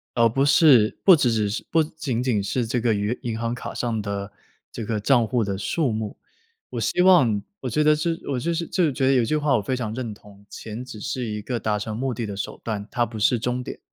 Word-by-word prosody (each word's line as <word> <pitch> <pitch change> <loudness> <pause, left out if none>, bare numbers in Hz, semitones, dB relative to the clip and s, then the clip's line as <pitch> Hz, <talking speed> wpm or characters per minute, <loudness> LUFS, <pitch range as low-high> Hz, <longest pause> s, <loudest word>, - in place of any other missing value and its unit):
而 115 -1 +5
不 135 +5 +1
是 140 -7 +5
不 190 -3 +8
只 125 -6 +2
只 110 -2 +1
是 105 - -3
不 165 -1 +3
仅 145 -6 -3
仅 110 -6 +1
是 120 +4 -1
这 120 0 -1
个 120 - +2
余 105 +4 -1
银 115 -2 -3
行 115 0 -1
卡 125 - -6
上 115 -3 -2
的 100 0 -4 0.4
这 - - -6
个 105 0 -2
帐 120 +1 +3
户 120 -1 +1
的 100 -1 -2
数 130 - 0
目。 110 -1 -4 0.5
我 - - -4
希 180 - +1
望 135 - +5 0.2
我 130 - -4
觉 150 +7 +1
得 150 0 +5
这 155 +3 -1 0.2
我 140 - -1
我 125 - -1
就 170 +7 -1
是 170 0 -2
就 185 - 0
是 155 - +3
觉 135 0 -1
得 135 - +4
有 125 - +4
一 - - 0
句 155 - +1
话 145 -2 +2
我 105 - +1
非 130 +6 -2
常 110 -4 -3
认 120 -2 -4
同， 100 -1 -15
钱 110 +4 -7
只 125 -4 -9
是 130 0 -3
一 105 -1 -4
个 120 0 -3
达 105 0 0
成 105 +1 -4
目 130 0 -2
的 115 - -3
的 100 -2 -5
手 100 - -5
段， 105 -2 -4
它 120 -2 0
不 110 -1 -8
是 120 +3 +3
终 125 +3 -2
点。 - - -8
120 Hz, 290 characters per minute, -24 LUFS, 105-135 Hz, 0.5 s, 不